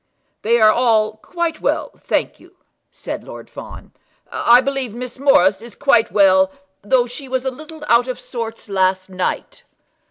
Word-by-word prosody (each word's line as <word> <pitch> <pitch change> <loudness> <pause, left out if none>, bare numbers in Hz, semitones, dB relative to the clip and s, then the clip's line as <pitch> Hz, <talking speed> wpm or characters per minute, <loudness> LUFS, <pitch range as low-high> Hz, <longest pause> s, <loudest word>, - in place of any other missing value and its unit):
"They 235 +2 +2
are, 215 -1 +6
all 220 -3 +2
quite 335 +6 -4
well, - - -1
thank - - -2
you," - - -20 0.3
said - - -7
Lord - - -11
Fawn. - - -11 0.4
"I 240 +1 +5
believe 265 -4 -3
Miss 250 +1 -7
Morris 195 -8 +4
is 235 -2 -11
quite 255 -5 +2
well, 190 -2 +4 0.3
though 245 +4 +2
she 245 +3 -9
was 260 0 -2
a 265 - 0
little 310 +3 -11
out 235 +1 +4
of 255 - -4
sorts 230 -2 -7
last 190 -1 0
night." 185 - -3
235 Hz, 160 wpm, -19 LUFS, 210-260 Hz, 0.4 s, are